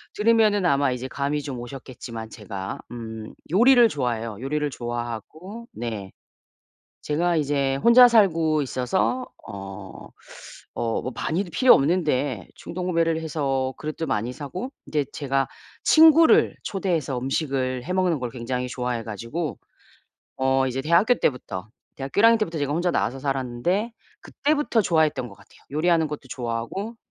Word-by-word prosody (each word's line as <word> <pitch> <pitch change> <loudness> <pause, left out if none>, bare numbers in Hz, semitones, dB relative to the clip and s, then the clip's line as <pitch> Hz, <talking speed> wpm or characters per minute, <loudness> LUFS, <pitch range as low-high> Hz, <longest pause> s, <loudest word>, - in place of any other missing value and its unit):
들으면은 215 -2 +3
아마 140 -5 +3
이제 125 +1 -4
감이 140 +2 -2
좀 135 -3 -6
오셨겠지만 120 -2 -8
제가 100 -3 -6
음 110 -2 -7 0.2
요리를 240 +4 +6
좋아해요, 115 -6 -2
요리를 150 +2 -1
좋아하고 120 - -6
네. 110 -4 -5 0.9
제가 170 +3 0
이제 140 -3 +1
혼자 235 - +8
살고 165 -9 +3
있어서 135 - -1 0.2
어 95 -1 -9 0.7
어 115 -1 -1
뭐 130 - -4
많이도 175 +3 -2
필요 255 +9 +6
없는데 140 - 0
충동구매를 170 -2 -1
해서 135 -4 -1
그릇도 155 +1 -4
많이 120 -2 -1
사고 165 - -6 0.2
인제 150 -2 0
제가 135 -2 0 0.4
친구를 320 +1 +6
초대해서 170 -9 -1
음식을 130 -1 -1
해먹는 180 -3 +1
걸 125 -1 -3
굉장히 125 +1 -3
좋아해 125 -2 -3
가지고 115 - -5 0.8
어 130 0 +2
이제 130 +1 -2
대학교 170 - +4
때부터 110 - -2 0.3
대학교 135 +6 -5
1 - - +4
학년 230 0 +6
때부터 170 -7 -2
제가 145 -1 -1
혼자 175 +3 +1
나와서 125 -1 -1
살았는데 135 - -1 0.3
그때부터 290 -6 0
좋아했던 155 -8 +1
것 100 - -13
같아요. - - -21
요리하는 160 +1 +2
것도 150 0 -6
좋아하고 125 - -4
140 Hz, 325 characters per minute, -24 LUFS, 125-175 Hz, 0.9 s, 혼자